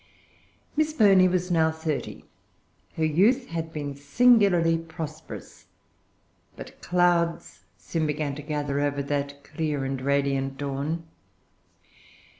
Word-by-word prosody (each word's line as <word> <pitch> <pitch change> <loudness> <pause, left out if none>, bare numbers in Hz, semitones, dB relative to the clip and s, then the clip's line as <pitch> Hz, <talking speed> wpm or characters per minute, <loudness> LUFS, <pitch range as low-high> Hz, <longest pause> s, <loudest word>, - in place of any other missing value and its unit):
Miss 310 0 +1
Burney 195 -8 +6
was 180 0 -1
now 160 -2 +3
thirty. 160 -2 -4 0.7
Her 160 - +1
youth 210 - +2
had 165 -1 -4
been 145 -2 -5
singularly 175 - +4
prosperous; 160 -1 -9 0.9
but - - -11
clouds 175 -1 0
soon 160 -2 -2
began 150 -1 -2
to 150 - -7
gather 145 -1 -2
over 145 -1 0
that 140 0 -3
clear 150 -3 -3
and 135 -1 -3
radiant 135 0 0
dawn. 145 +4 -3
155 Hz, 110 wpm, -26 LUFS, 140-175 Hz, 0.9 s, Burney